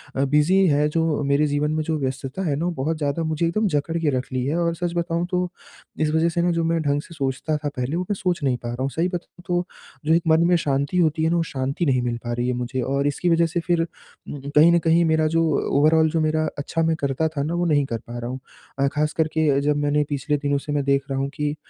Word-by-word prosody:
अ, 135 - +1
busy 155 +7 +3
है, 150 0 +3
जो 160 -2 0
मेरे 140 +2 +2
जीवन 145 +1 0
में 155 0 0
जो 160 0 -1
व्यस्तता 135 +5 -4
है 140 - +1
ना 165 +4 -2
वो 175 - 0
बहुत 160 +1 -1
ज़्यादा 150 +2 -1
मुझे 160 +1 0
एकदम 215 +5 +1
जकड़ 160 +1 -1
के 160 -3 +1
रख 130 - -5
ली 125 -1 0
है 155 +5 0
और 170 0 0
सच 175 0 -3
बताऊँ 170 0 -1
तो, 180 0 0 0.5
इस 155 -1 +2
वज़ह 165 +1 +3
से 170 +1 -1
ना 175 0 +2
जो 165 0 0
मैं 165 0 +1
ढंग 145 -1 0
से 170 - -14
सोचता 140 +2 -2
था 150 0 -4
पहले, 125 +6 -2
वो 180 - -1
मैं - - +2
सोच 180 -5 -2
नहीं 130 -3 +1
पा 120 - -6
रहा 120 +2 -5
हूँ। 135 - 0
सही 165 +5 0
बताऊँ 175 0 -7
तो 175 0 0 0.4
जो 160 - +3
एक 170 - +4
मन 160 +1 +4
में 175 - +4
शांति 140 +3 -1
होती 160 -2 +2
है 160 - +3
ना, 170 - +1
वो 165 - +2
शांति 135 +3 -2
नहीं 130 -3 +2
मिल 120 -1 -2
पा 120 - -2
रही 120 +1 -1
है 125 - +1
मुझे 125 +1 -3
और 140 +1 +1
इसकी 175 +5 0
वज़ह 170 0 +4
से 170 +2 -2
फिर 170 0 +1
उम, 155 -3 -9 0.2
कहीं 160 +3 +7
न 170 - +4
कहीं 165 +1 +3
मेरा 160 -1 +2
जो 165 +1 +2 0.3
ओवरऑल 160 +2 +4
जो 165 - 0
मेरा 155 0 +1
अच्छा 165 +3 -2
मैं 160 0 +2
करता 140 +2 -1
था 145 -3 -3
ना 160 +3 -2
वो 175 0 0
नहीं 145 -4 +2
कर 115 -3 -3
पा 120 0 -6
रहा 120 +1 -5
हूँ। 130 +1 -5 0.4
अ, 140 - +3
ख़ासकर 150 +1 0
के 150 -3 +2
जब 150 0 +1
मैंने 145 0 +1
पिछले 145 +1 -1
दिनों 145 0 0
से 145 +1 -5
मैं 145 -1 0
देख 140 0 +2
रहा 135 0 -1
हूँ 135 0 -1
कि 150 -1 -2
155 Hz, 275 wpm, -23 LUFS, 140-165 Hz, 0.5 s, कहीं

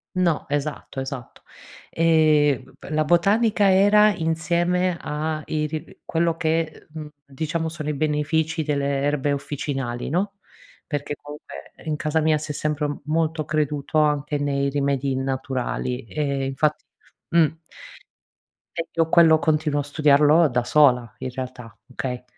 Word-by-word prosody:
No, 175 -4 +1
esatto, 145 -1 -3
esatto. 130 -2 -7 0.5
Ehm 155 -5 +3
b - - -13
la 155 0 +2
botanica 200 +5 +3
era 205 +2 +5
insieme 175 +2 0
a 155 +1 -3
iri 155 0 -4
quello 165 0 0
che 160 0 +1
e 160 -1 -6
uhm 155 -1 -7 0.2
diciamo 160 +4 -3
sono 160 -2 -5
i 150 - -1
benefici 155 +2 0
delle 140 -2 -1
erbe 145 0 0
officinali, 135 -3 -4
no, 190 +6 -1 0.5
perché 145 -1 -3
comunque 145 +1 -11
in 155 -1 -1
casa 155 +1 0
mia 155 0 +3
si 150 0 -5
è - - -4
sempre 150 0 -1
m 145 - -5
molto 160 0 0
creduto 150 -1 -1
anche 150 -1 +1
nei 140 -1 0
rimedi 140 -1 0
naturali, 130 -1 -3
ehm, 140 -1 -2
infatti 135 +3 0 0.5
mh. 170 -2 +5 1.3
E 165 0 -3
io 165 -1 +2
quello 165 -1 +6
continuo 155 -2 +1
a - - -5
studiarlo 150 +2 +4
da 125 -1 0
sola 125 -4 +3
in - - -4
realtà, 125 -2 -8
okay? 125 -1 -4
150 Hz, 140 wpm, -23 LUFS, 140-160 Hz, 1.3 s, quello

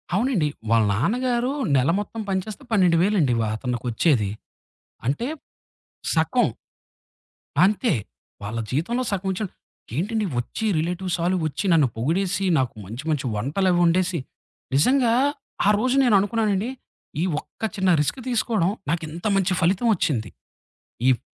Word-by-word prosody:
అవునండి. 210 - +2 0.2
వాళ్ళ 115 -1 +5
నాన్నగారు 245 - 0 0.2
నెల 130 +2 +3
మొత్తం 220 +2 -5
పని 190 -1 +1
చేస్తే 220 +6 -8
12,000 180 -6 +4
వేలండి 185 -10 +2
వా 110 - 0
అతనుకొచ్చేది. 120 - 0 0.8
అంటే 145 - 0 0.9
సగం, - - +2 1.2
అంతే. 210 +4 +2 0.5
వాళ్ళ 110 +3 -4
జీవితంలో 190 - 0
సగమించ 190 -1 -2 0.6
ఏంటండి 210 +6 0
ఒచ్చి 120 - -4
రిలేటివ్సాలొచ్చి 175 0 -1
నన్ను 155 -5 +5
పొగిడేసి, 180 +10 0
నాకు 130 -3 0
మంచి 115 +9 -7
మంచి 145 -4 -1
వంటలవొండేసి, 175 - +2 0.6
నిజంగా 245 - +4 0.5
ఆ - - +6
రోజు 255 +4 +1
నేను 240 -4 +4
అనుకున్నానండి. 210 +1 0 0.5
ఈ - - +2 0.2
ఒక్క - - -24
చిన్న 190 -1 +2
రిస్క్ 150 - 0
తీసుకోవడం 220 -6 +1 0.2
నాకు 165 +1 0
ఇంత 170 +6 -7
మంచి 190 -1 +2
ఫలితం 185 +7 +2
ఒచ్చింది. 125 - -1 0.8
ఈప్ 125 -4 +3
180 Hz, 120 wpm, -24 LUFS, 145-210 Hz, 1.2 s, ఆ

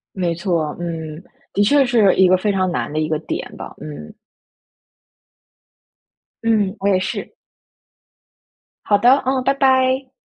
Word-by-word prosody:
没 180 -3 -1
错， 170 -4 -2
嗯， 160 -2 -5 0.3
的 205 - +2
确 280 +5 +4
是 230 -6 +3
一 190 -1 +4
个 185 - +5
非 205 +2 0
常 185 -2 0
难 - - -3
的 155 - -1
一 155 - -1
个 155 - -1
点 160 - -6
吧， - - -9
嗯。 75 0 -9 2.3
嗯， 215 -3 +1
我 200 - -1
也 190 -2 +2
是。 185 - -5 1.5
好 205 -1 +3
的， 255 +3 +4
嗯， 260 0 +1
拜 275 - +2
拜。 260 -1 +2
195 Hz, 150 characters per minute, -19 LUFS, 170-250 Hz, 2.3 s, 个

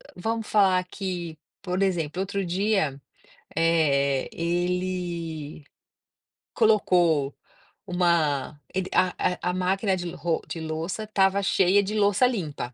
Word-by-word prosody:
vamos 225 +4 -3
falar 190 -3 +4
que, 180 -4 -5 0.2
por 185 0 -1
exemplo, 175 -2 -1
outro 195 0 -2
dia, 180 -6 0 0.5
eh, 140 -5 +2
ele 175 -3 -3 0.9
colocou 175 - +3 0.5
uma 170 -6 +1 0.2
ele 185 -1 -1
a 180 0 +1
a 180 - -1
máquina 190 +2 0
de 175 -1 -4
ro 170 -2 -1
de 165 - -5
louça 160 +6 -4
estava 200 -2 +2
cheia 195 +1 +3
de 210 +3 -3
louça 205 +4 +4
limpa. 155 - -3
180 Hz, 115 wpm, -25 LUFS, 160-195 Hz, 0.9 s, falar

